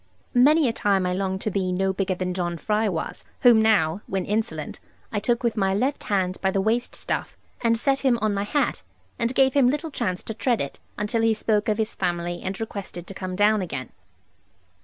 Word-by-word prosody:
Many 290 +4 +5
a 230 - 0
time 195 -4 +1
I 180 - 0
longed 190 0 -2
to 215 - -1
be 185 -1 0
no 190 +1 +1
bigger 190 -1 -1
than 180 0 -2
John 175 -2 -2
Fry 215 +4 0
was; 165 -4 -4 0.2
whom 240 -3 +7
now 200 -5 +3
(when 190 -1 -2
insolent) 220 +3 -2 0.3
I 210 - 0
took 235 +4 0
with 235 -2 +1
my 195 -3 +1
left 265 +7 -1
hand 185 -2 0
by 190 - +2
the 195 - 0
waist 225 +5 0
stuff, - - -3 0.2
and 230 -1 +3
set 270 +3 +1
him 260 -4 +3
on 215 -2 +1
my 200 - -1
hat, 245 +9 0 0.4
and 235 +2 0
gave 265 -1 +4
him 270 -3 +5
little 300 +3 -2
chance 185 -8 -2
to 220 - -5
tread 235 +1 0
it; 140 - -4 0.2
until 210 +3 0
he 225 -1 +3
spoke 215 0 +1
of 210 - +1
his 220 -1 -1
family, 175 -1 -2
and 190 +1 -4
requested 200 -5 -6
to 195 - -8
come 185 -1 -5
down 210 +1 +3
again. 140 -8 -5
210 Hz, 215 wpm, -24 LUFS, 185-230 Hz, 0.4 s, whom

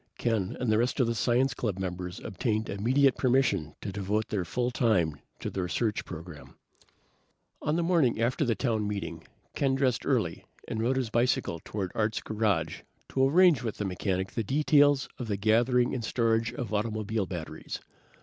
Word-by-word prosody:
Ken 110 -6 -1
and 120 -3 0
the 110 - +3
rest 120 +4 0
of 130 - +4
the 115 - 0
science 120 +4 +2
club 105 -6 -2
members 90 0 -4
obtained 110 +1 -2
immediate 130 +6 +3
permission 120 - +1
to 100 - -4
devote 100 +2 -1
their 100 -4 -1
full 120 +8 -1
time 90 - +1 0.2
to - - -4
the 95 - -2
research 100 +5 -1
program. 85 -3 -9 1.1
On 150 - 0
the 170 - +1
morning 165 -10 +2
after 120 +5 +1
the 120 -5 +1
town 110 -5 0
meeting, 85 -5 -4 0.3
Ken 135 -1 +1
dressed 130 -3 +1
early - - 0 0.2
and 110 -2 -2
rode 125 +4 +1
his 125 -4 -1
bicycle 120 -8 +1
toward 95 -4 -4
Art's 110 -1 0
garage 110 -2 -1 0.3
to 135 0 +3
arrange 175 -1 +5
with 115 -4 -4
the 105 - -2
mechanic 95 0 -2
the 115 - -2
details 145 +2 +4
of 120 - -4
the 100 -2 -1
gathering 120 +4 +3
and 125 - -3
storage 115 0 +1
of 120 -2 -5
automobile 110 -1 -1
batteries. 80 -3 -6
110 Hz, 175 wpm, -29 LUFS, 100-125 Hz, 1.1 s, arrange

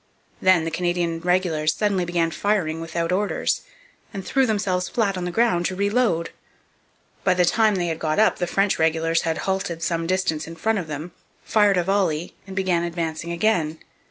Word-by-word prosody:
Then 185 -3 +4
the 165 - -3
Canadian 175 -1 -1
regulars 170 -3 +1
suddenly 200 -4 0
began 170 -1 0
firing 170 -5 0
without 165 +1 -2
orders, 200 +3 0 0.5
and 195 -3 -6
threw 270 -2 +2
themselves 200 -4 0
flat 205 -5 0
on 180 -1 -3
the 180 - -3
ground 175 -5 +2
to 185 - -4
reload. 200 -4 +1 0.9
By 185 -1 +3
the 180 -1 +3
time 215 +3 +3
they 180 -2 0
had 165 -1 -2
got 155 -1 -1
up 220 +1 +4
the 175 - 0
French 195 +2 +1
regulars 165 +1 +2
had 165 -2 -1
halted 190 -3 -2
some 165 -1 -1
distance 180 -4 0
in 165 - -8
front 220 +6 0
of 175 - -6
them, 155 +3 -6 0.3
fired 205 -3 +3
a 175 - +2
volley, 180 -4 0
and 190 - -8
begun 185 -3 +1
advancing 170 -1 -3
again. 170 -4 +1
175 Hz, 185 wpm, -23 LUFS, 165-195 Hz, 0.9 s, Then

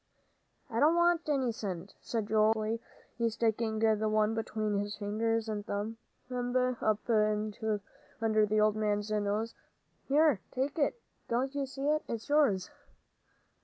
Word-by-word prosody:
"I 230 - -2
don't 310 +4 +5
want 345 -2 +3
any 265 -4 +2
cent," 195 -4 -5
said 220 -3 -3
Joel, 215 0 +4
hotly, 220 +1 -2 0.5
sticking 225 0 0
the 220 -1 +2
one 215 0 +2
between 215 -2 -1
his 205 0 -3
finger 220 +2 0
and 210 -1 -3
thumb 205 +3 -3 0.4
up 245 -3 0 1.2
under 215 -1 +4
the 215 +1 +2
old 215 0 +4
man's 210 -1 0
nose. 210 +2 0 0.5
"Here, 295 -4 +4
take 275 +5 -2
it. 300 +11 +1 0.3
Don't 255 +4 0
you 280 -1 -2
see 270 +1 -4
it? 305 +1 +2
It's 230 +3 -5
yours." 255 -12 +3
220 Hz, 135 wpm, -31 LUFS, 215-255 Hz, 1.2 s, don't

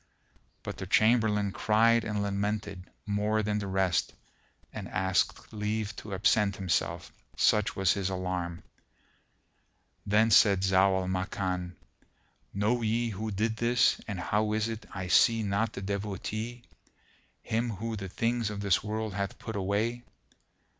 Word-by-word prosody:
But - - -6
the - - -6
Chamberlain 110 -3 +3
cried 115 +3 +3
and 105 -1 -2
lamented 100 -1 -3 0.2
more 105 +1 0
than 105 0 0
the 100 - -4
rest 95 -3 0 0.6
and - - -6
asked 95 +3 -1
leave 105 0 -2
to 100 -2 -6
absent 100 0 +2
himself, 95 -4 -2 0.2
such 105 -1 +3
was 95 -2 +3
his 95 -2 -2
alarm. 90 -2 -3 1.4
Then 110 +2 +3
said 100 -3 +6
Zau 95 0 +3
al 90 - -4
Makan, 95 -1 -2 0.8
"Know 110 +5 0
ye 115 +1 0
who 110 +1 -4
did 110 +2 -1
this 120 +1 +3
deed - - -17
and 100 -4 -4
how 105 +3 0
is 110 +1 0
it 115 0 -6
I 95 -2 -5
see 115 +5 +4
not 100 +2 0
the 95 - -6
Devotee, 105 +4 -4 0.8
him 115 +2 -1
who 110 +2 -4
the 100 -2 -6
things 115 +2 0
of 105 -1 -5
this 100 -2 +2
world 110 0 -3
hath 100 0 -3
put 110 - -7
away?" 105 +5 -1
105 Hz, 145 wpm, -29 LUFS, 95-110 Hz, 1.4 s, said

